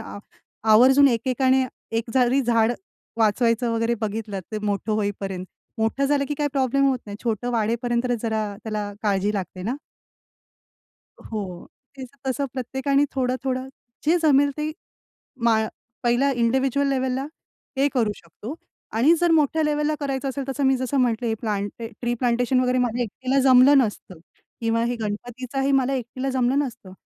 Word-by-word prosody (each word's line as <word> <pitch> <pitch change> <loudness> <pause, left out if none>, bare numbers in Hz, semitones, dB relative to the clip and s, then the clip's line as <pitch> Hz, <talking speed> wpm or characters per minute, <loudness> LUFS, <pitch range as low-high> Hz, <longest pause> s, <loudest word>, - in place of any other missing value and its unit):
आ - - -8 0.5
आवर्जून 265 +5 +7
एकेकाने 260 +2 +2 0.3
एक 230 0 -5
जरी 255 +1 +3
झाड 230 -1 +3 0.5
वाचवायचं 230 +2 +2
वगैरे 230 +1 +1
बघितलं 215 -2 -3
तर 215 - -1
मोठं 205 +1 -1
होईपर्यंत, 195 -3 -2 0.3
मोठं 225 +5 +1
झालं 280 -1 +2
की 295 - -1
काय 295 - +1
प्रॉब्लेम 275 0 +2
होत 260 - +1
नाही. 205 - -6
छोटं 235 +1 -1
वाढेपर्यंत 235 +2 0 0.2
जरा 220 -2 -1 0.2
त्याला 210 -2 -3
काळजी 205 -1 +1
लागते 185 -2 -4
ना. 235 +7 -1 1.5
हो, 195 -5 -6 0.3
ते 265 - -6 0.2
तसं 265 +2 0
प्रत्येकाने 265 +2 0
थोडं-थोडं 255 0 -1 0.4
जे 320 +3 +4
जमेल 285 -2 +4
ते 305 - -1 0.8
माळ 220 -1 +3 0.4
पहिल्या 245 +3 +2
इंडिव्हिज्युअल 265 +3 +2
लेव्हलला 260 0 -1 0.5
हे 280 +1 +4
करू 225 -5 +2
शकतो, 205 - -9 0.4
आणि 255 +9 +4
जर 345 -1 +3
मोठ्या 315 0 +3
लेव्हलला 300 0 +1
करायचं 275 -1 -2
असेल 270 0 -3
तसं 275 +1 -1
मी 265 - +4
जसं 260 +2 -2
म्हटले 240 -1 +1
हे 225 - +1
प्लांट 205 -3 -2 0.3
ट्री 240 0 0
प्लांटेशन 245 +1 +1
वगैरे 255 0 +1
मला 245 -1 0
एकटीला 255 +5 -1
जमलं 260 +3 +7
नसतं 205 -7 -2 0.4
किंवा 230 0 +1
हे 240 +1 -1
गणपतीचाही 245 +5 -3
मला 270 0 +1
एकटीला 255 +2 -4
जमलं 260 +1 +1
नसतं. 240 -9 -4
245 Hz, 150 wpm, -23 LUFS, 220-270 Hz, 1.5 s, आवर्जून